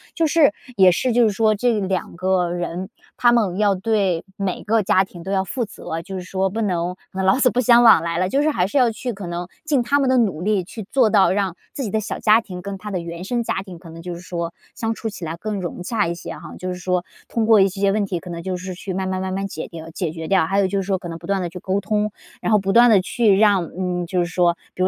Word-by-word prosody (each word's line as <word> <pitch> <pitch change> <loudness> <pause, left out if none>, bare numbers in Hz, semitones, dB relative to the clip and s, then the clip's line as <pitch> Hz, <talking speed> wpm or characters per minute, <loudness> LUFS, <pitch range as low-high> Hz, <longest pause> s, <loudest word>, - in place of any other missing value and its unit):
就 330 - +2
是 310 -5 +4 0.3
也 190 -2 +7
是 250 +8 0
就 240 0 +4
是 - - +4
说 215 +2 +2
这 225 +1 +1
两 190 -3 -2
个 185 0 +1
人， 175 +2 -4 0.3
他 240 - +5
们 210 -5 +1
要 205 -2 +3
对 190 -4 0
每 195 -2 -3
个 220 +1 +2
家 190 -1 +3
庭 180 -2 -11
都 190 +3 -5
要 190 -1 +1
负 240 +6 -2
责， 165 -6 -6
就 190 +2 -8
是 185 - -5
说 190 +1 -1
不 220 +4 -4
能 180 -3 -1 0.3
老 190 +6 +4
死 255 -2 +3
不 250 - +1
相 240 0 +6
往 225 - +8
来 170 0 -2
了。 185 +1 +1
就 275 +7 +2
是 310 - +2
还 180 -11 +1
是 205 +9 +1
要 245 -2 +4
去 240 +2 -4
可 195 -3 -7
能 175 +1 -4 0.2
尽 290 -6 +1
他 285 +4 +2
们 270 -2 +2
的 260 - +4
努 195 -10 +1
力， 200 0 +1
去 215 +5 -8
做 250 -6 +3
到 200 -3 +5
让 190 -2 0 0.2
自 275 - -4
己 215 - -3
的 220 - +1
小 215 - -4
家 220 +1 +4
庭 180 -5 -9
跟 200 0 -6
他 210 - -7
的 185 -3 -2
原 170 +1 -7
生 235 +4 -1
家 195 - -2
庭 185 -3 -10
可 165 -1 -13
能 165 +1 -10
就 175 0 -6
是 - - -9
说， 170 -2 -4 0.2
相 225 0 -2
处 225 - -5
起 205 -5 -7
来 165 +1 -4
更 210 +1 -4
融 175 0 -5
洽 205 -1 0
一 170 - -1
些 - - -8
哈。 - - -12 0.2
就 185 - -4
是 180 - -3
说 180 0 -1 0.2
通 230 -2 -1
过 220 -2 +6
一 195 - +5
些 195 +1 0
问 205 0 +1
题 185 -3 -3
可 180 - -11
能 170 -1 -5
就 185 0 -2
是 185 +1 -6
去 190 +1 -6
慢 190 +1 -2
慢 185 0 -2
慢 190 0 -3
慢 195 +1 -2
解 160 - -6
掉 165 -1 -9
解 165 -1 -3
决 160 -1 -6
掉。 190 -4 +3
还 195 +4 +1
有 195 - +3
就 195 +1 -1
是 - - -4
说 195 -1 0
可 180 - -8
能 165 -1 -6
不 170 - -12
断 195 -1 0
地 175 - -3
去 180 - -8
沟 190 +2 -1
通， 210 +1 0 0.3
然 - - -1
后 215 - +5
不 195 0 -1
断 240 +1 +7
地 205 -4 +5
去 200 0 +2
让， 200 -5 +3
嗯， 180 -1 -2
就 180 +1 -1
是 175 - +2
说 175 0 +1 0.2
比 185 - -1
如 185 - +4
190 Hz, 315 characters per minute, -21 LUFS, 180-215 Hz, 0.3 s, 往